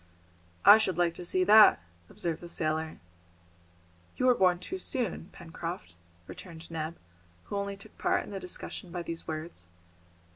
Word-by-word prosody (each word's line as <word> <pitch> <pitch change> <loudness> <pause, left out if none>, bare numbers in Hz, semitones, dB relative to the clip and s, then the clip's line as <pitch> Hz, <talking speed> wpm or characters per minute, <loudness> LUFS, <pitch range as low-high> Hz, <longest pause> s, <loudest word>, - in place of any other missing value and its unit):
"I 210 +2 +10
should 190 -6 +1
like 175 -1 +2
to 175 - -8
see 185 +1 +1
that," 210 +2 +8 0.3
observed 165 -2 -4
the 175 - -9
sailor. 155 -1 -2 1.2
"You 255 - 0
were 255 - +7
born 185 -5 +3
too 365 - -6
soon, 240 - -3
Pencroft," 165 - -7 0.3
returned 165 - -10
Neb, 160 +1 -4 0.5
who - - -6
only 200 0 -3
took 210 +2 -14
part - - +1
in - - -11
the 195 - -4
discussion 180 0 -5
by 175 -1 -4
these 165 -1 -5
words. 155 - -6
175 Hz, 155 wpm, -29 LUFS, 165-200 Hz, 1.2 s, I